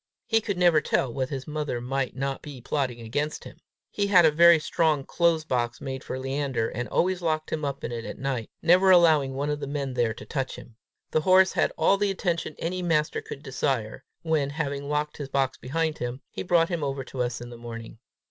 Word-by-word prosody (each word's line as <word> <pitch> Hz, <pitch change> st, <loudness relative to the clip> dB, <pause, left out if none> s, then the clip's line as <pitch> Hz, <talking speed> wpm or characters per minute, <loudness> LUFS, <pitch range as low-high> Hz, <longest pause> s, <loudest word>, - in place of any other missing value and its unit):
He 225 Hz, -1 st, +2 dB
could 205 Hz, -3 st, -3 dB
never 175 Hz, -4 st, +5 dB
tell 130 Hz, -3 st, 0 dB
what 130 Hz, 0 st, -2 dB
his 135 Hz, -2 st, -5 dB
mother 150 Hz, -5 st, -3 dB
might 130 Hz, +1 st, -2 dB
not 135 Hz, +1 st, -3 dB
be 145 Hz, -4 st, -9 dB
plotting 125 Hz, -1 st, -2 dB
against 145 Hz, +7 st, -3 dB
him. -, -, -11 dB, 0.3 s
He 200 Hz, -1 st, 0 dB
had 180 Hz, -4 st, +6 dB
a 155 Hz, -, +6 dB
very 170 Hz, +2 st, +7 dB
strong 155 Hz, -1 st, +1 dB
close 170 Hz, -2 st, +2 dB
box 120 Hz, -5 st, -1 dB
made 130 Hz, 0 st, -5 dB
for 130 Hz, -, -5 dB
Leander, 135 Hz, -3 st, -1 dB
and 120 Hz, +2 st, -4 dB
always 185 Hz, 0 st, +1 dB
locked 155 Hz, -2 st, -1 dB
him 155 Hz, -1 st, -2 dB
up 140 Hz, -1 st, -3 dB
in -, -, -3 dB
it 115 Hz, -1 st, -4 dB
at -, -, -7 dB
night, 130 Hz, -5 st, -3 dB
never 180 Hz, +3 st, +5 dB
allowing 160 Hz, -7 st, +5 dB
one 145 Hz, +2 st, -1 dB
of 150 Hz, -, -2 dB
the 140 Hz, -, -5 dB
men 140 Hz, -2 st, -3 dB
there 120 Hz, -2 st, 0 dB
to -, -, -10 dB
touch 135 Hz, -4 st, -3 dB
him. 115 Hz, -, -13 dB, 0.4 s
The 155 Hz, -, +2 dB
horse 185 Hz, +3 st, +5 dB
had -, -, +1 dB
all 200 Hz, -, +4 dB
the 205 Hz, 0 st, +1 dB
attention 175 Hz, -5 st, -2 dB
any 180 Hz, +2 st, -3 dB
master 155 Hz, -3 st, +1 dB
could 140 Hz, -, -9 dB
desire, 130 Hz, -5 st, -2 dB, 0.2 s
when, 155 Hz, -4 st, +1 dB
having 140 Hz, -1 st, -3 dB
locked 150 Hz, 0 st, -1 dB
his 145 Hz, -2 st, -6 dB
box 135 Hz, -1 st, 0 dB
behind 160 Hz, +4 st, -2 dB
him, 125 Hz, +2 st, -4 dB
he -, -, -5 dB
brought 170 Hz, -2 st, +3 dB
him 170 Hz, -4 st, -2 dB
over 135 Hz, -1 st, -2 dB
to 130 Hz, 0 st, -5 dB
us 125 Hz, 0 st, -2 dB
in 120 Hz, 0 st, -9 dB
the -, -, -8 dB
morning. 115 Hz, -1 st, -9 dB
145 Hz, 225 wpm, -26 LUFS, 130-165 Hz, 0.4 s, very